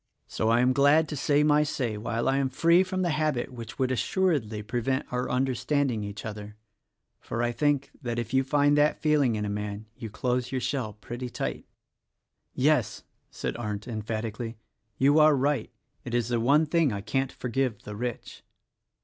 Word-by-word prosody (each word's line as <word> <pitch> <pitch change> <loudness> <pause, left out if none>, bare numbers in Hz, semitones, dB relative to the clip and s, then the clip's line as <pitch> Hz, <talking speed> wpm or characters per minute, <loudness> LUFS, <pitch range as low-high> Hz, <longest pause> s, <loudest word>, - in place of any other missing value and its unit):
So 110 - -1
I 115 +1 +4
am 125 +1 +3
glad 145 +4 +4
to 150 - -3
5 140 - -5
o - - -4
THE 145 - +3
RECORDING 150 - +4
ANGEL 150 - +2
say 145 -2 -3
my - - +2
say - - -5
while 115 +2 -2
I 135 - +2
am 135 -1 +1
free 170 +5 +4
from 185 0 -2
the 175 - +1
habit 150 -5 -1
which 115 -2 -8
would 130 -1 +1
assuredly 130 - 0
prevent 120 +5 -1
our 125 +1 -1
understanding 130 -1 0
each 100 0 -7
other; 105 -1 -7 0.6
for - - -6
1 120 0 0
think 145 +1 +1
that 120 -3 -3
if 120 +1 -4
you 130 0 +4
find 145 +2 +3
that 150 +1 +3
feeling 150 -7 +2
in 105 -1 -2
a - - -3
man 105 +1 -4
you 115 -1 -7
close 125 +3 -1
your 130 - -1
shell 125 -5 -2
pretty 120 +4 -7
tight." - - -4 0.9
"Yes!" - - +1 0.3
said - - -4
Arndt, 105 -1 -4
emphatically, 110 0 -4 0.4
"you 145 +3 +4
are 155 -1 +6
right. 135 -2 0 0.3
It 120 - -4
is 120 -1 0
the 120 -1 +1
one 140 +7 +4
thing 155 -2 +2
I 100 -1 -3
can't 135 +5 -1
forgive 125 -3 -2
the 105 - -7
rich." 120 +2 -5
125 Hz, 200 wpm, -27 LUFS, 115-145 Hz, 0.9 s, are